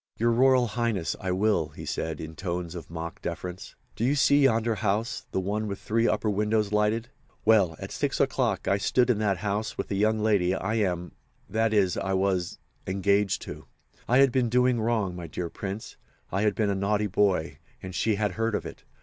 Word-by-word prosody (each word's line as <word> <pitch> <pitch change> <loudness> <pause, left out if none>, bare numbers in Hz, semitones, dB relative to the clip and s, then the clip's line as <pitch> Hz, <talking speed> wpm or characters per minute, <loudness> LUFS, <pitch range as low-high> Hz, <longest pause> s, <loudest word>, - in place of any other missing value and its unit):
"Your 115 +1 +2
Royal 130 +1 +4
Highness, 115 -7 -1
I 95 - -4
will," 95 -4 +2
he 75 - -10
said, 80 -1 -3
in 80 0 -7
tones 85 -1 -4
of 85 -2 -8
mock 85 0 -6
deference. 90 0 -6 0.2
"Do - - -3
you 135 +4 +3
see 145 +1 +4
yonder 115 -2 +2
house—the 110 +2 -2
one 105 +3 -2
with 100 -1 -4
three 115 +3 0
upper - - 0
windows 105 0 +1
lighted? 105 +2 +1 0.4
Well, 105 -7 +4
at - - -7
6 - - -1
o'clock - - 0
I 100 - +2
stood 125 +4 +3
in 110 - 0
that 100 -3 +1
house 100 +2 -2
with - - -4
the 100 - -1
young 110 +2 +2
lady 100 -4 +2
I 95 +3 -2
am—that 105 +2 -2
is, 100 -4 +2
I 95 - -1
was—engaged 95 +1 0
to. - - -9 0.4
I 125 - +4
had 135 -1 +6
been 125 -2 +1
doing 125 0 +3
wrong, 110 -5 0
my 85 -1 -6
dear 85 +2 -5
Prince—I 100 -1 -6
had 105 -1 +2
been 105 -2 +1
a - - +1
naughty 100 +2 0
boy, 90 -7 +1 0.2
and 95 -1 -6
she 110 +3 +1
had 105 -1 0
heard 115 +3 -1
of - - -3
it. - - -9
105 Hz, 190 wpm, -27 LUFS, 95-110 Hz, 0.4 s, had